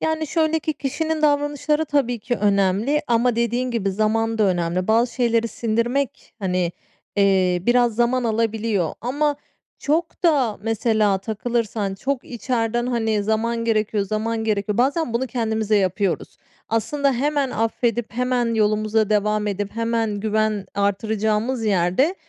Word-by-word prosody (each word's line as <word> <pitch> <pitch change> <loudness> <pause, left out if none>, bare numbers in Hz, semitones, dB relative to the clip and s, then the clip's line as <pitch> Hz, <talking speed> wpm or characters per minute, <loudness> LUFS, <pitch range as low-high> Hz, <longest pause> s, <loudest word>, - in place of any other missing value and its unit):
Yani, 315 0 -1
şöyle 320 +1 +1
ki 310 0 -2
kişinin 310 +3 -2
davranışları, 290 +1 +1
tabii 270 -5 0
ki, 245 +3 -2
önemli 205 +7 +2
ama 240 0 +2
dediğin 240 +2 0
gibi 215 -5 -1
zaman 225 +3 0
da - - +3
önemli. 180 0 0
Bazı 230 +2 +2
şeyleri 230 -2 +1
sindirmek, 235 +4 -2
hani, 180 -3 -1 0.4
eee, 190 -3 +3
biraz 240 -1 +3
zaman 240 +1 +2
alabiliyor. 220 -5 0
Ama 290 +4 0 0.4
çok 325 +4 -1
da, 270 -10 +3
mesela, 220 -2 +1
takılırsan 215 -1 -2
çok 265 +6 -3
içeriden, 240 -1 -1
hani, 225 -4 0
"zaman 230 +2 -1
gerekiyor, 215 -2 +1
zaman 220 +2 -2
gerekiyor." 210 -1 -1
Bazen 275 +1 +1
bunu 255 +3 0
kendimize 220 -4 0
yapıyoruz. 190 -1 -1 0.3
Aslında, 275 +6 +1
hemen 280 +1 0
affedip, 230 0 -1
hemen 245 -1 0
yolumuza 215 0 +1
devam 210 0 +1
edip 205 0 -3
hemen 230 -2 -1
güven 215 -2 0
artıracağımız 215 +4 0
yerde 200 - +2
225 Hz, 130 wpm, -22 LUFS, 210-250 Hz, 0.4 s, da